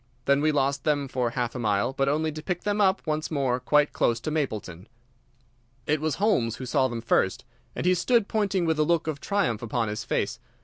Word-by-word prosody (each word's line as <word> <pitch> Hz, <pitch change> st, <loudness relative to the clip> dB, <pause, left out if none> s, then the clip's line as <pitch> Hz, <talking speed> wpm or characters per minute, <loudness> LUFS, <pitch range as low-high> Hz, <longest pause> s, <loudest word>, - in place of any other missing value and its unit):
Then 140 Hz, +1 st, +3 dB
we 155 Hz, +1 st, +3 dB
lost 140 Hz, -1 st, 0 dB
them 145 Hz, -2 st, +1 dB
for 125 Hz, -2 st, -1 dB
half 120 Hz, 0 st, -2 dB
a 125 Hz, -, -5 dB
mile, 105 Hz, +2 st, 0 dB
but 135 Hz, 0 st, +1 dB
only 155 Hz, +2 st, 0 dB
to 155 Hz, +1 st, -7 dB
pick 175 Hz, +2 st, -3 dB
them 210 Hz, 0 st, 0 dB
up 190 Hz, -1 st, +2 dB
once 155 Hz, -1 st, -2 dB
more 135 Hz, -5 st, 0 dB
quite 150 Hz, +3 st, +2 dB
close 115 Hz, -1 st, +1 dB
to 155 Hz, -, -3 dB
Mapleton. 110 Hz, -, -3 dB, 1.0 s
It 150 Hz, 0 st, 0 dB
was 155 Hz, -2 st, 0 dB
Holmes 190 Hz, -, +1 dB
who 130 Hz, -, -7 dB
saw 130 Hz, +1 st, +2 dB
them 120 Hz, -2 st, -5 dB
first, 95 Hz, -5 st, +1 dB, 0.3 s
and -, -, -3 dB
he 180 Hz, -, +5 dB
stood 215 Hz, +4 st, +2 dB
pointing 200 Hz, -4 st, 0 dB
with 160 Hz, -1 st, 0 dB
a -, -, +5 dB
look 170 Hz, +1 st, +1 dB
of 155 Hz, -3 st, -4 dB
triumph 200 Hz, -, 0 dB
upon 115 Hz, -1 st, -1 dB
his 105 Hz, -, -4 dB
face. -, -, -2 dB
145 Hz, 220 wpm, -26 LUFS, 120-160 Hz, 1.0 s, he